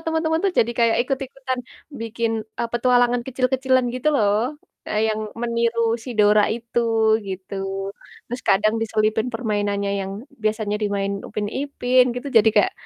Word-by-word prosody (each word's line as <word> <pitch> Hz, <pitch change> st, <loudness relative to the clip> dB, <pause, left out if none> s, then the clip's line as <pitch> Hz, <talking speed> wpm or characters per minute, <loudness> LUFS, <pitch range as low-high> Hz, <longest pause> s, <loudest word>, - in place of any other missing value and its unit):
temen-temen 320 Hz, 0 st, +1 dB
tuh 390 Hz, -, +2 dB
jadi 235 Hz, +1 st, +3 dB
kayak 230 Hz, -1 st, +4 dB
ikut-ikutan 265 Hz, -1 st, -3 dB, 0.4 s
bikin, 230 Hz, 0 st, -2 dB, 0.3 s
e -, -, +1 dB
petualangan 245 Hz, 0 st, +3 dB
kecil-kecilan 260 Hz, 0 st, +1 dB
gitu 255 Hz, +4 st, 0 dB
loh, 205 Hz, -4 st, +3 dB, 0.5 s
eee, 210 Hz, -, 0 dB
yang 215 Hz, 0 st, -1 dB, 0.2 s
meniru 235 Hz, 0 st, 0 dB, 0.2 s
si 255 Hz, -, -6 dB
Dora 210 Hz, 0 st, +6 dB
itu, 235 Hz, 0 st, -2 dB, 0.5 s
gitu. 190 Hz, +1 st, -6 dB, 0.7 s
Terus 245 Hz, +2 st, -5 dB
kadang 215 Hz, +3 st, +4 dB
diselipin 220 Hz, 0 st, +1 dB
permainannya 205 Hz, -3 st, -1 dB
yang 195 Hz, 0 st, -4 dB, 0.3 s
biasanya 215 Hz, -1 st, 0 dB
dimainin 200 Hz, -1 st, -1 dB
Upin 210 Hz, -, -3 dB
Ipin, 255 Hz, -3 st, +2 dB
gitu, 250 Hz, +3 st, -5 dB
jadi 220 Hz, -, +5 dB
kayak, 380 Hz, -, +4 dB
235 Hz, 140 wpm, -22 LUFS, 210-255 Hz, 0.7 s, Dora